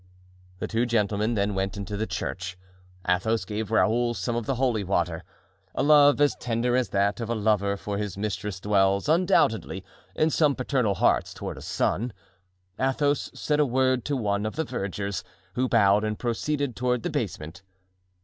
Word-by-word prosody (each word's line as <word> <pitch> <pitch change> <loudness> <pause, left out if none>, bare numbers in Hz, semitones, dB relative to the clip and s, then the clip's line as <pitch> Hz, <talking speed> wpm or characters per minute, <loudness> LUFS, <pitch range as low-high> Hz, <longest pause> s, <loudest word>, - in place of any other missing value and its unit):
The - - -3
two 115 +2 0
gentlemen 105 0 +1
then 100 0 0
went 95 +2 -2
into 100 +1 -4
the 110 +2 -2
church. 90 0 -4 0.5
Athos 95 +4 +1
gave 105 +2 -4
Raoul 120 +2 +2
some 120 0 -2
of 120 -2 -3
the 135 - 0
holy 120 -4 +1
water. 90 -2 -1 0.5
A - - +1
love 145 -1 +6
as 145 -1 +3
tender 120 +1 0
as 125 -1 +1
that 100 +2 +1
of 115 -2 -4
a 120 - 0
lover 100 -2 +1
for 100 0 -4
his 100 -2 -4
mistress 105 -2 -3
dwells, 100 0 +2
undoubtedly, 160 - +2 0.3
in 155 +1 +2
some 150 -3 +3
paternal 125 -6 0
hearts - - +2
toward - - -5
a - - -10
son. 120 +3 -1 0.7
Athos 145 +2 +1
said 150 -1 0
a - - +6
word 130 0 +2
to 145 -1 0
one 100 -3 0
of 110 - -6
the 160 - 0
vergers, 100 - -4 0.3
who 130 0 0
bowed 105 -2 +4
and 105 0 -2
proceeded 130 +2 -2
toward 125 -2 0
the - - -2
basement. 80 +4 -4
110 Hz, 175 wpm, -26 LUFS, 100-125 Hz, 0.7 s, love